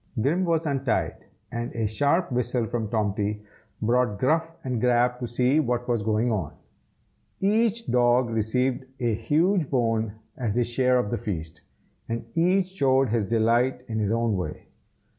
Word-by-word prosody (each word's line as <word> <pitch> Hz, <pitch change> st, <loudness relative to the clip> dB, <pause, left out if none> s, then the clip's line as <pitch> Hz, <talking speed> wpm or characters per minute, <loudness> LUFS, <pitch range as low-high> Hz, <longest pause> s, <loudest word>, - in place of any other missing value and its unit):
Grim 160 Hz, +11 st, +1 dB
was 165 Hz, -1 st, +1 dB
untied, 135 Hz, -5 st, -1 dB, 0.3 s
and 120 Hz, +1 st, -4 dB
a 115 Hz, -1 st, 0 dB
sharp 145 Hz, -, +1 dB
whistle 125 Hz, -1 st, 0 dB
from 115 Hz, -1 st, -2 dB
Tomty 105 Hz, -1 st, -1 dB, 0.4 s
brought 120 Hz, -2 st, +2 dB
Gruff 160 Hz, +8 st, +1 dB
and 125 Hz, -4 st, -2 dB
Grab 125 Hz, 0 st, +2 dB
to 120 Hz, -, -3 dB
see 125 Hz, +5 st, +2 dB
what 125 Hz, -4 st, -1 dB
was 120 Hz, -3 st, +1 dB
going 110 Hz, +3 st, +1 dB
on. 95 Hz, -9 st, -2 dB, 0.9 s
Each 225 Hz, +3 st, +1 dB
dog 120 Hz, 0 st, +3 dB
received 125 Hz, +4 st, 0 dB
a 120 Hz, -3 st, +1 dB
huge 155 Hz, -, +1 dB
bone 115 Hz, -4 st, 0 dB, 0.2 s
as 115 Hz, -6 st, -2 dB
his 120 Hz, -1 st, +2 dB
share 125 Hz, +2 st, +2 dB
of 115 Hz, -5 st, -1 dB
the 120 Hz, -, 0 dB
feast, 80 Hz, -7 st, -5 dB, 0.5 s
and 115 Hz, 0 st, -3 dB
each 180 Hz, +3 st, +3 dB
showed 135 Hz, -8 st, +2 dB
his 110 Hz, -3 st, 0 dB
delight 120 Hz, +3 st, +1 dB
in 110 Hz, -2 st, -2 dB
his 105 Hz, -1 st, 0 dB
own 115 Hz, -2 st, +1 dB
way. 90 Hz, -5 st, -5 dB
120 Hz, 160 wpm, -25 LUFS, 110-135 Hz, 0.9 s, dog